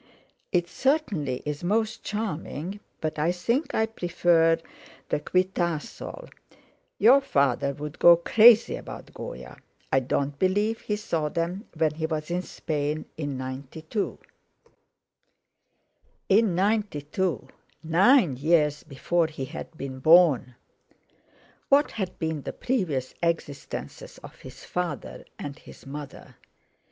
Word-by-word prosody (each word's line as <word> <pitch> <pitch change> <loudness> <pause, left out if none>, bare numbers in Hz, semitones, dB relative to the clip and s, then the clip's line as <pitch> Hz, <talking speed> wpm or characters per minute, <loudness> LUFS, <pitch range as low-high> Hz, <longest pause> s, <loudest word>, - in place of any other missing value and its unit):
"It 175 -2 +1
certainly 190 - 0
is 150 +1 -4
most 220 +4 0
charming; 195 -3 -4 0.2
but 155 -1 -2
I 160 +3 +2
think 235 - -1
I 220 - +3
prefer 175 -5 +2 0.5
the - - +1
'Quitasol' 175 -2 -2 0.7
Your 250 +7 +6
father 140 - +1
would 150 +1 -7
go 170 0 +8
crazy 230 - +6
about - - -10
Goya; - - -8 0.4
I 135 - +6
don't 140 +2 -2
believe 205 +4 +1
he 210 - -2
saw 165 -8 -2
them 175 +7 -3
when 155 -1 +2
he 160 +1 -2
was 155 0 -3
in 180 +1 0
Spain 150 -3 -3
in 145 -4 -4
'92." 140 - -4 2.1
In 205 -2 +4
'92—nine 185 - +1
years 150 0 +2
before 160 +4 0
he 150 -4 -6
had - - -8
been 130 -2 -6
born! 150 -5 +5 1.1
What 285 +2 +4
had 190 -4 -4
been 160 -2 -2
the - - -6
previous 165 - -1
existences 165 -5 -4
of - - -10
his - - -12
father 175 -5 -4
and 145 +1 -7
his - - -15
mother? 140 0 -9
165 Hz, 115 wpm, -26 LUFS, 145-200 Hz, 2.1 s, go